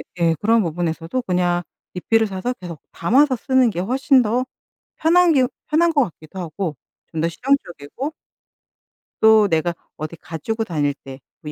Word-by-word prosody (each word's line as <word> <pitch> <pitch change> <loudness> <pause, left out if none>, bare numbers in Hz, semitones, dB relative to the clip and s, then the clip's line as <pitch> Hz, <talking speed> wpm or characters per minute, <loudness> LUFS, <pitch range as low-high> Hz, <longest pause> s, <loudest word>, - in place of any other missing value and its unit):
네 170 -2 +2
그런 225 +2 +4
부분에서도 165 +5 -2
그냥 175 -2 0 0.3
리필을 225 +5 +1
사서 195 +5 -3
계속 170 -4 -8
담아서 260 - +3
쓰는 260 +1 +3
게 175 - -4
훨씬 260 +7 +3
더 240 +3 0 0.5
편한 345 +2 +4
게 260 -3 +4 0.2
편한 335 +2 +3
것 285 -3 +4
같기도 165 -2 -9
하고 170 -1 -4 0.4
좀 160 - -3
더 165 - +2
실용적이고 255 - -2 1.1
또 220 -1 +6
내가 170 -1 0 0.2
어디 155 +2 -6
가지고 220 +9 -4
다닐 150 -8 -1
때 135 -1 -12 0.3
뭐 150 - -5
190 Hz, 290 characters per minute, -21 LUFS, 165-255 Hz, 1.1 s, 또